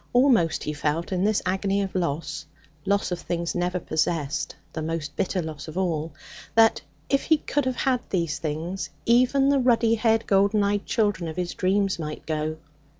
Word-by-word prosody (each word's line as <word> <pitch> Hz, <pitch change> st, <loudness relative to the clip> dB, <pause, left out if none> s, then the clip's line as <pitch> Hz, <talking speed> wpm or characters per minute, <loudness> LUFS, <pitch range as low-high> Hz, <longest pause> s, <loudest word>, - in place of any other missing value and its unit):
Almost 245 Hz, -, +3 dB
he 150 Hz, -, -2 dB
felt, 150 Hz, +4 st, -2 dB
in 185 Hz, 0 st, 0 dB
this 210 Hz, 0 st, +2 dB
agony 195 Hz, +2 st, 0 dB
of 195 Hz, -, -5 dB
loss 155 Hz, -3 st, -2 dB, 0.4 s
loss 200 Hz, -1 st, +1 dB
of 175 Hz, -, -2 dB
things 170 Hz, -1 st, -2 dB
never 180 Hz, +1 st, -1 dB
possessed, 160 Hz, -2 st, -1 dB, 0.2 s
the 160 Hz, -, -3 dB
most 160 Hz, -1 st, -3 dB
bitter 185 Hz, -1 st, -1 dB
loss 155 Hz, -2 st, -7 dB
of 155 Hz, +3 st, -7 dB
all 165 Hz, -4 st, -1 dB, 0.4 s
that, 225 Hz, -6 st, +5 dB, 0.3 s
if 275 Hz, -, +1 dB
he 315 Hz, -, +4 dB
could 290 Hz, -1 st, -1 dB
have 260 Hz, -1 st, 0 dB
had 255 Hz, +1 st, +1 dB
these 170 Hz, -5 st, -1 dB
things, 165 Hz, +4 st, -3 dB, 0.2 s
even 255 Hz, +4 st, +4 dB
the 280 Hz, -1 st, +3 dB
ruddy 235 Hz, -3 st, +3 dB
haired, 225 Hz, 0 st, +2 dB
golden 200 Hz, +1 st, +3 dB
eyed 200 Hz, 0 st, 0 dB
children 205 Hz, -6 st, 0 dB
of 160 Hz, -, -6 dB
his 180 Hz, -1 st, -2 dB
dreams 195 Hz, 0 st, +1 dB
might 150 Hz, -1 st, -5 dB
go. 155 Hz, 0 st, -2 dB
185 Hz, 180 wpm, -25 LUFS, 160-220 Hz, 0.4 s, that